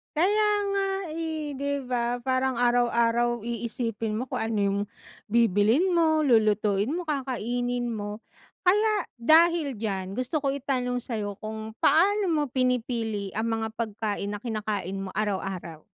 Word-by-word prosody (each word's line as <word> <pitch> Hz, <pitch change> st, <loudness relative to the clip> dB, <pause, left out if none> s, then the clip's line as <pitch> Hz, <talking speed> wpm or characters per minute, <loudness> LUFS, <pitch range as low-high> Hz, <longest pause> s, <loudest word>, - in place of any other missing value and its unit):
Kaya 410 Hz, +7 st, +3 dB, 0.2 s
nga 395 Hz, 0 st, +1 dB, 0.2 s
eh, 315 Hz, -3 st, -4 dB
di 280 Hz, +1 st, -1 dB
ba, 245 Hz, 0 st, -1 dB
parang 260 Hz, +1 st, +1 dB
araw-araw 240 Hz, -1 st, +2 dB
iisipin 230 Hz, -1 st, -3 dB
mo 240 Hz, +4 st, -3 dB
kung -, -, -2 dB
ano 225 Hz, -2 st, -1 dB
yung 200 Hz, 0 st, +1 dB, 0.5 s
bibilhin 230 Hz, -, +3 dB
mo, 325 Hz, -3 st, +3 dB
lulutuin 215 Hz, -3 st, +2 dB
mo, 350 Hz, -, -2 dB
kakainin 245 Hz, -5 st, -2 dB
mo. 210 Hz, -1 st, -5 dB, 0.4 s
Kaya 420 Hz, +3 st, +2 dB
dahil 315 Hz, +3 st, +4 dB
diyan, 195 Hz, -4 st, -3 dB
gusto 255 Hz, +7 st, -1 dB
ko 275 Hz, -2 st, 0 dB
itanong 250 Hz, -3 st, -1 dB
sayo 215 Hz, -4 st, -4 dB
kung 220 Hz, 0 st, -6 dB
paano 395 Hz, +4 st, +4 dB
mo 310 Hz, -3 st, +2 dB
pinipili 235 Hz, -6 st, -1 dB
ang 225 Hz, +1 st, -1 dB
mga 220 Hz, 0 st, -3 dB
pagkain 215 Hz, -2 st, -3 dB
na 205 Hz, -, -3 dB
kinakain 210 Hz, -4 st, -3 dB
mo 195 Hz, -, -5 dB
araw-araw? 190 Hz, -6 st, -3 dB
240 Hz, 135 wpm, -27 LUFS, 215-280 Hz, 0.5 s, dahil